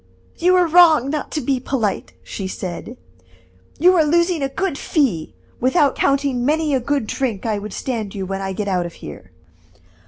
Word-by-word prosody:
"You 365 +2 +4
are 360 -1 +4
wrong 320 -5 +5
not 305 -1 -3
to 305 - -1
be 265 0 0
polite," 240 -6 -2
she 195 - -6
said; 190 +6 -6 0.8
"you 360 +5 +5
are 330 - +4
losing 340 +1 +2
a 275 - -1
good 385 0 -2
fee, 240 - -1 0.2
without 275 +3 +3
counting 275 -3 +1
many 305 +2 +1
a 265 - +2
good 275 0 -1
drink 230 -3 -3
I 215 -2 -1
would 210 +1 -7
stand 220 -5 -4
you 195 -1 -3
when 195 +1 -4
I 195 0 -3
get 200 +2 -4
out 180 -3 0
of 170 - -12
here." 75 - -11
265 Hz, 185 wpm, -20 LUFS, 205-310 Hz, 0.8 s, wrong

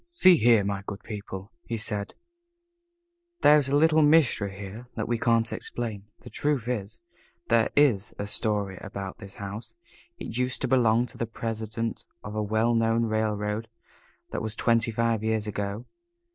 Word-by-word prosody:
"See 185 - +6
here, 115 -4 +5
my 100 0 -2
good 100 0 -6
people," 100 -1 -7
he 115 - -4
said, 105 -2 -4 1.3
"there 150 +1 +7
is 135 -2 -1
a 140 - +2
little 160 +1 +5
mystery 145 -11 +3
here 105 +5 -8
that 105 - -2
we 120 -1 0
can't 115 -1 +2
explain. 110 -5 -5 0.2
The 120 - -11
truth 145 -6 -1
is, 115 - -4 0.5
there 115 -1 +4
is 125 -9 +3
a 100 - -3
story 100 -3 -1
about 100 -2 -6
this 100 -2 -10
house. 105 +3 -7 0.4
It - - -7
used 125 0 +1
to - - +2
belong 120 -2 +3
to - - -12
the 115 - -1
president 115 0 -4 0.2
of 105 - -6
a 110 - -1
well 110 +3 +1
known 115 0 +2
railroad. 110 0 -1 0.6
That - - -3
was 110 0 -2
twenty 115 -1 +2
five 115 -1 0
years 110 -1 0
ago. 105 +2 -4
110 Hz, 165 wpm, -27 LUFS, 105-120 Hz, 1.3 s, there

